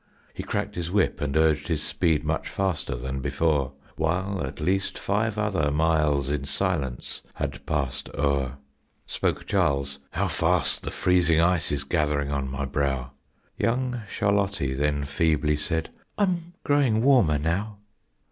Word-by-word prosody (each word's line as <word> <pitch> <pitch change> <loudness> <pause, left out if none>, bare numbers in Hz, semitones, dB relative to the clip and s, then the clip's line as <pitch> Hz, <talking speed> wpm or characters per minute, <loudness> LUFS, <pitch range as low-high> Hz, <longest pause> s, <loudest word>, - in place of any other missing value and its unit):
He - - -5
cracked - - -2
his 85 -1 -3
whip 100 +1 +1
and 75 0 0
urged 80 -1 +3
his 80 -3 -1
speed 80 -4 +1
much - - -1
faster 95 -9 -1
than 65 +2 -4
before, 70 -2 +1 0.2
While 90 +3 0
at 70 +2 -5
least 95 +5 0
five 105 +2 0
other 95 -8 +1
miles 75 -2 +2
in 70 -1 -1
silence 70 -6 -2
had 70 0 -4
passed 70 -5 -2
o'er. 70 -2 0 0.5
Spoke - - -1
Charles, 70 0 +1
"How - - +1
fast - - +1
the - - -4
freezing 85 -3 +3
ice 85 0 +2
is 70 -1 -1
gathering 70 0 0
on 70 -2 -1
my 65 +1 -3
brow!" 70 -2 -1 0.5
Young 125 +1 0
Charlottie 100 -8 +1
then 75 +1 0
feebly 75 0 +1
said, 80 +2 -2 0.3
"I'm 175 -4 0
growing 130 -6 +3
warmer 120 - +5
now." 95 +8 -1
80 Hz, 145 wpm, -26 LUFS, 70-95 Hz, 0.5 s, warmer